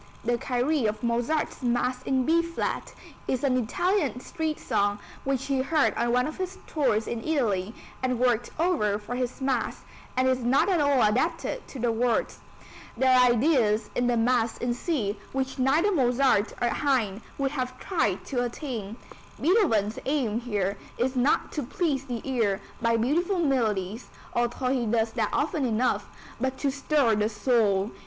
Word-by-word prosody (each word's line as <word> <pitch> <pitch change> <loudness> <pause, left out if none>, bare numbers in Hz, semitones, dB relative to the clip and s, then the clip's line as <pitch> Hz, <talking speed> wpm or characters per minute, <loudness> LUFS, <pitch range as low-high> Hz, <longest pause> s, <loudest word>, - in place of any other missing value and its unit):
The 240 0 +1
Kyrie 255 +1 +1
of 215 +3 -3
Mozart's 240 +8 -1
Mass 250 +1 0
in 260 -1 0
B 330 +2 +4
flat 335 0 -3 0.4
is 255 0 -1
an 265 -2 +2
Italian 275 - 0
street 315 +4 -3
song 205 0 0 0.3
which 270 -1 -1
he 270 -2 0
heard 305 +2 +2
on 235 0 0
one 250 +1 +3
of 310 - -5
his 375 0 -4
tours 240 -8 +1
in 230 -1 -4
Italy 220 -10 0 0.3
and 255 -1 0
worked 240 -1 +1
over 300 - +2
for 215 +4 -6
this 250 +1 -3
Mass, 265 -3 -1 0.4
and 255 0 +3
is 260 -1 +2
not 250 +9 +2
at 355 -5 +2
all 285 -4 +3
adapted 320 - 0
to - - -9
the 240 -1 +1
words. 235 +1 0 0.6
There 260 +1 +4
are 250 0 +6
ideas 235 -4 +2
in 245 - +1
the 240 -1 +2
Mass 230 0 +2
in 245 0 -1
C 240 - -2
which 265 0 -2
neither 300 +10 +3
Mozart 250 - +2
nor 240 -1 +1
Haydn 235 -8 0 0.2
would 275 -1 0
have 255 -3 -4
tried 215 - -1
to 245 -3 -1
attain. 235 -4 -5 0.4
Beethoven's 230 - +2
aim 255 -6 0
here 205 -5 -2 0.2
is 255 +2 0
not 255 +3 +2
to 300 - -2
please 275 0 -1
the 245 -4 -4
ear 225 -7 +1 0.2
by 230 0 +2
beautiful 335 - +1
melodies, 225 - 0 0.3
although 240 +1 0
he 250 -3 0
does 225 0 +1
that - - -1
often 300 - 0
enough, 225 -3 0 0.3
but 260 +1 -1
to 280 - 0
stir 275 -3 +2
the 210 +1 +1
soul. 210 -2 +1
250 Hz, 170 wpm, -27 LUFS, 225-275 Hz, 0.6 s, are